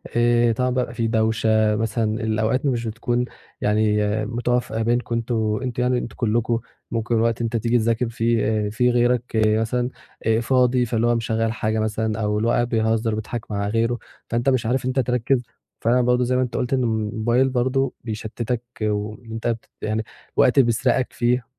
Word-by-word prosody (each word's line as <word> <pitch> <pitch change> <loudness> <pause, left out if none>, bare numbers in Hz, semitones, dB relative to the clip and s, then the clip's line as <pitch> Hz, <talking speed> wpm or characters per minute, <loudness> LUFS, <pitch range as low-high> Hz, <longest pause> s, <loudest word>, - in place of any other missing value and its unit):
آآ، 120 0 +4
طبعًا 125 +3 0
بقى 125 -2 -1
في 115 -1 -1
دوشة 110 -1 +2
مثلًا 110 +1 -1
الأوقات 110 +4 0
مش 120 -4 0
بتكون 120 +2 -1 0.4
يعني 105 0 +2 0.3
متوافقة 120 0 -1
بينكم 120 +1 0
أنتم 110 -2 0
أنتم 125 -1 -2
يعني 125 0 +2
أنتم 120 - -5
كلكم 115 0 0 0.3
ممكن 115 +1 -1
الوقت 115 +1 +1
تيجي 115 +1 +1
تذاكر 115 +1 +1
فيه 115 -1 +1 0.2
آآ - - -2
في 125 +4 +2
غيرك 120 0 +2
مثلًا 110 +3 +2 0.4
آآ 110 0 +3
فاضي 125 0 +3
فاللي 115 0 0
هو 120 - +3
مشغّل 115 -1 0
حاجة 110 -1 -1
مثلًا 110 0 -1
أو 105 0 0
اللي 110 +2 0
هو - - +3
قاعد 120 0 +1
بيهزر 110 -1 +1
بيضحك 110 +1 -5
مع 100 0 -1
غيره، 115 +3 +1 0.3
فأنت 120 +3 +1
مش 130 -4 +1
عارف 125 +2 0
أنت 130 +1 0
تركز 125 0 +1 0.4
فأنا 120 +2 +3
برضه 125 0 +2
زي 125 +1 +1
ما 130 - +2
أنت 125 -2 -2
قُلت 125 +1 -1
إن 130 -1 +2
الموبايل 115 +3 +1
برضه 130 +1 0
بيشتتك 115 +2 -3 0.2
وإن 105 +2 -3
أنت 115 +1 -3
ت 115 -1 -3
يعني 110 +1 -1 0.3
وقت 130 +2 +4
بيسرقك 120 +1 +2
فيه، 120 0 +1
115 Hz, 175 wpm, -22 LUFS, 110-125 Hz, 0.4 s, آآ